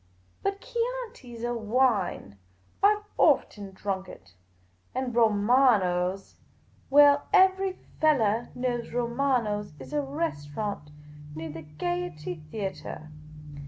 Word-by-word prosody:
But 395 0 -2
Chianfi 475 - -4
's 230 - -8
a 240 0 -1
wine; 220 - 0 0.4
I 410 +1 +6
've 420 - -11 0.2
often 200 -2 +2
drunk 190 0 -4
it; - - -14 0.6
and 255 -1 -2
Romano's 205 -5 +2 0.2
— - - -36 0.2
well, 285 +1 +6
ever}' 380 0 +4 0.3
fellah 240 -8 +2
knows 245 -2 -2
Romano's 235 - 0
is 135 - -10
a - - 0
restau 275 - -3
rant 200 -9 -4 0.4
near 160 0 -5
the 160 +2 -8
Gaiety 175 +2 -4 0.2
Theatre." 190 -5 -6
230 Hz, 115 wpm, -27 LUFS, 190-280 Hz, 0.6 s, I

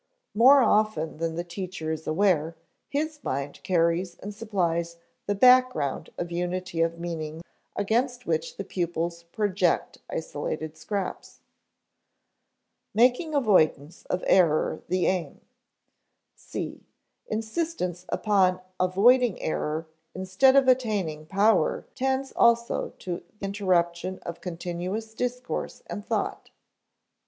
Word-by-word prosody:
More 260 +5 +7
often 210 -9 +1
than 165 0 -2
the 170 - -2
teacher 175 -2 -5
is 160 0 -5
aware, 165 -2 +2 0.3
his 300 +1 -2
mind 140 +2 -3
carries 175 0 +1
and 205 +1 -7
supplies 170 -6 -1 0.3
the 205 - +1
background 250 - +4
of 175 0 -4
unity 175 0 -2
of 165 0 +1
meaning 165 -2 -5 0.3
against 245 +5 0
which 160 0 -1
pupils 170 -1 -2
project 185 0 0
isolated 155 0 -4
scraps. 185 +5 -5 1.5
[Sidenote: - - -31
Making 250 +7 +3
avoidance 170 - +2
of 180 - -2
error 165 -5 +3
the 185 0 +1
aim] 185 -3 -1 0.9
(c) - - -6 0.5
Insistence 220 - -3
upon 190 -4 +2 0.2
avoiding 220 +5 +4
error 155 +1 -2 0.3
instead 190 +9 +3
of 275 -1 +5
attaining 205 -12 +1
power 200 -1 +2
tends 265 +1 -1
also 235 0 +2
to 175 -2 -5 0.2
interruption 185 -3 0
of 170 - -6
continuous 180 +5 -4
discourse 250 +2 -4
and 205 - -6
thought. - - -2
185 Hz, 110 wpm, -26 LUFS, 170-220 Hz, 1.5 s, More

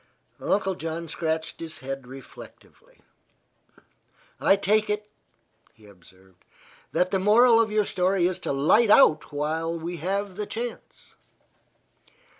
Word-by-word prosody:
Uncle 195 -1 0
John 165 -1 -5
scratched 160 0 -3
his 165 -1 -7
head 135 +1 -7
reflectively. 135 - -15 1.4
"I 195 - +4
take 210 +2 +1
it," 210 0 -2 0.7
he 110 -2 -20
observed, 95 -1 -20 0.5
"that 180 +1 0
the 195 - +1
moral 225 +4 +5
of 225 - 0
your 210 -1 +1
story 185 -1 +1
is 180 0 -1
to - - -3
light 155 +12 +3
out 160 - +5
while 160 +3 -2
we 170 +2 -6
have 195 +3 -3
the 210 -1 -4
chance." 235 +1 -7
180 Hz, 125 wpm, -25 LUFS, 155-210 Hz, 1.4 s, moral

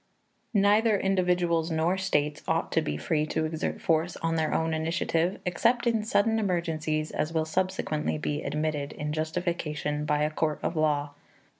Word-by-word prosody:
Neither 210 +2 +4
individuals 180 -3 +1
nor 165 +3 +1
states 150 -6 0
ought - - 0
to - - +2
be 75 0 -2
free 150 - 0
to 155 - -1
exert 160 +1 -3
force 165 +2 +1
on 165 0 -1
their 160 -1 0
own 160 0 0
initiative, 165 +2 0
except 235 +7 +2
in 230 -2 +2
such 215 - -6
sudden 225 0 +1
emergencies 160 -5 -1
as 155 - -1
will 160 -1 +1
subsequently 160 -3 -1
be 150 0 -2
admitted 150 -2 -2
in 150 0 -4
justification 155 -2 -2
by 150 0 +1
a 150 - 0
court 155 0 0
of 170 - -1
law. 150 -2 +1
160 Hz, 165 wpm, -28 LUFS, 155-180 Hz, -, Neither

